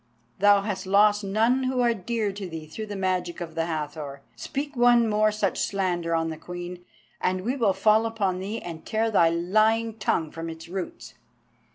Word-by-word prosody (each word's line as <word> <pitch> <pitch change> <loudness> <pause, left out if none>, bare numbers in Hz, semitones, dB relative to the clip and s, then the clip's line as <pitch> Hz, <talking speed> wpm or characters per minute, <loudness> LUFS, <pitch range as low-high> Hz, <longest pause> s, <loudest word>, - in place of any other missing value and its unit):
Thou 205 0 +6
hast 195 -3 -4
lost 205 +1 +4
none 225 +6 +2
who 255 0 0
are 240 -1 +3
dear 225 0 -2
to 195 -1 -6
thee 160 -2 -7
through 215 +8 -7
the 205 - -5
magic 185 -2 -1
of 170 -2 -6
the 165 0 -1
Hathor. 150 -3 -5
Speak 285 +1 -5
one 240 -1 +5
more 215 0 +3
such 210 -2 -1
slander 175 -4 0
on 165 0 0
the 160 - -6
Queen, 175 +1 -7 0.4
and 185 0 0
we 245 +7 -1
will 230 -7 +2
fall 220 +2 +3
upon 200 -5 -1
thee 205 +4 -4
and 165 -2 -8
tear 225 +1 0
thy 170 -5 +5
lying 215 +6 +2
tongue 160 -6 0
from 165 0 -6
its 160 0 -9
roots." 185 0 -6
195 Hz, 190 wpm, -26 LUFS, 170-220 Hz, 0.4 s, Thou